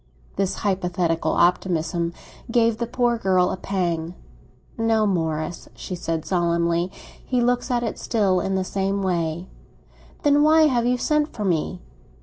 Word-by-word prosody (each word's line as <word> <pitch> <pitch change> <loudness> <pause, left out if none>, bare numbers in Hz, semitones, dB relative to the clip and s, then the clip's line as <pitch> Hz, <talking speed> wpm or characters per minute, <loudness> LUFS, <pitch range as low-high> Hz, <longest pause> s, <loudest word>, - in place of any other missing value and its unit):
This 195 -1 0
hypothetical 180 -4 0
optimism 170 -1 +1 0.4
gave 230 -1 +2
the 235 - -1
poor 240 -1 +1
girl 185 -3 +2
a - - -2
pang. 175 -3 -2 0.6
"No, 225 -1 +2
Morris," 160 -3 -2
she - - -7
said 165 -2 -3
solemnly, 170 0 +1 0.3
"he 250 - 0
looks 245 +2 +1
at 240 -1 0
it 230 - -3
still 200 -5 +1
in 195 +1 -1
the 190 - 0
same 195 +1 -1
way." 170 -2 -1 0.8
"Then 290 0 +4
why 315 +1 +6
have 245 -6 +2
you 250 0 +2
sent 300 +3 0
for 210 - -4
me?" 180 0 -1
190 Hz, 145 wpm, -23 LUFS, 170-235 Hz, 0.8 s, why